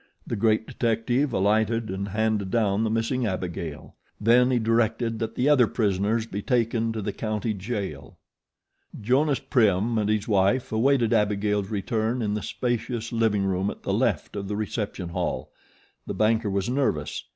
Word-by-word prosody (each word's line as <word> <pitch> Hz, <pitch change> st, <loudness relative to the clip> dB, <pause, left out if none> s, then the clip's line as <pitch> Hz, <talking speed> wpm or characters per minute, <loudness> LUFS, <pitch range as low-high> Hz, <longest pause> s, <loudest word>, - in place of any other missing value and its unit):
The -, -, -3 dB
great 110 Hz, +1 st, +2 dB
detective 120 Hz, +5 st, 0 dB
alighted 110 Hz, +2 st, +1 dB
and 95 Hz, +1 st, -3 dB
handed 105 Hz, -1 st, 0 dB
down 105 Hz, -1 st, +1 dB
the 110 Hz, -, 0 dB
missing 115 Hz, +2 st, 0 dB
Abigail. 85 Hz, -5 st, -5 dB, 0.3 s
Then 120 Hz, +4 st, +4 dB
he 130 Hz, -, +2 dB
directed 115 Hz, 0 st, +1 dB
that 115 Hz, 0 st, -3 dB
the 130 Hz, -, +1 dB
other 135 Hz, -6 st, +5 dB
prisoners 105 Hz, +1 st, 0 dB
be 100 Hz, -3 st, -5 dB
taken 115 Hz, -2 st, +1 dB
to 110 Hz, -2 st, -4 dB
the 100 Hz, -, -3 dB
county 110 Hz, +1 st, -2 dB
jail. 95 Hz, -, -5 dB, 0.8 s
Jonas 135 Hz, +6 st, +2 dB
Prim 110 Hz, -1 st, +2 dB
and 105 Hz, -1 st, 0 dB
his 110 Hz, +1 st, 0 dB
wife 105 Hz, +4 st, +2 dB
awaited 120 Hz, +1 st, +2 dB
Abigail's 105 Hz, -2 st, +1 dB
return 110 Hz, +3 st, -1 dB
in 105 Hz, -1 st, -1 dB
the 105 Hz, -, -2 dB
spacious 120 Hz, -1 st, -3 dB
living 110 Hz, -4 st, +1 dB
room 95 Hz, +1 st, 0 dB
at -, -, -8 dB
the -, -, -1 dB
left -, -, 0 dB
of 100 Hz, -1 st, -4 dB
the 105 Hz, -, -3 dB
reception 105 Hz, -4 st, -3 dB
hall. 85 Hz, -7 st, -3 dB, 0.6 s
The -, -, -3 dB
banker 110 Hz, 0 st, +2 dB
was 100 Hz, 0 st, -1 dB
nervous. 120 Hz, -, -1 dB
110 Hz, 160 wpm, -25 LUFS, 100-115 Hz, 0.8 s, other